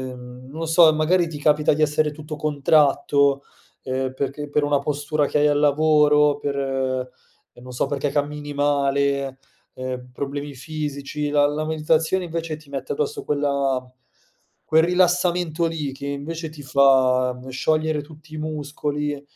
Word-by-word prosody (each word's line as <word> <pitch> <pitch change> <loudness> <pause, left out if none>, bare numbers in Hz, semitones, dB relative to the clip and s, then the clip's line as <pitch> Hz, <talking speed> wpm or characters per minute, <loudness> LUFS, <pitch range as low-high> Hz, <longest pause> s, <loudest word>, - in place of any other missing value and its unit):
mhmm, 125 +1 -12
non 150 +4 -9
lo 165 - -2
so, 165 -1 +6
magari 170 +3 +2
ti 155 -3 -7
capita 150 0 +3
di 155 - -2
essere 150 0 +2
tutto 155 0 -8
contratto, 140 -1 +2 0.4
ehm, 130 0 -3
perché 140 +2 -4
per 145 +1 0
una 145 -1 +2
postura 145 +1 -1
che 150 - 0
hai 150 - +4
al 145 0 +2
lavoro, 150 0 +4
per 135 -3 -2 0.5
non 125 +1 -11
so 120 - 0
perché 145 +1 -1
cammini 145 +1 -3
male, 140 -1 0 0.3
ehm, 130 -1 -6
problemi 140 +2 -5
fisici, 150 0 -4
la 145 0 +3
la 150 +1 -2
meditazione 160 +3 +1
invece 165 -2 -4
ti 150 -2 -17
mette 135 -1 -4
addosso 450 -1 -3
quella 140 -3 0 0.8
quel 160 +1 +3
rilassamento 175 -1 +2
lì 155 -4 -2
che 140 +1 -7
invece 160 +4 -4
ti 150 -1 -11
fa 130 -2 +3
sciogliere 155 +3 0
tutti 155 +1 -14
i - - -6
muscoli, 150 -1 -3
145 Hz, 150 wpm, -22 LUFS, 140-155 Hz, 0.8 s, so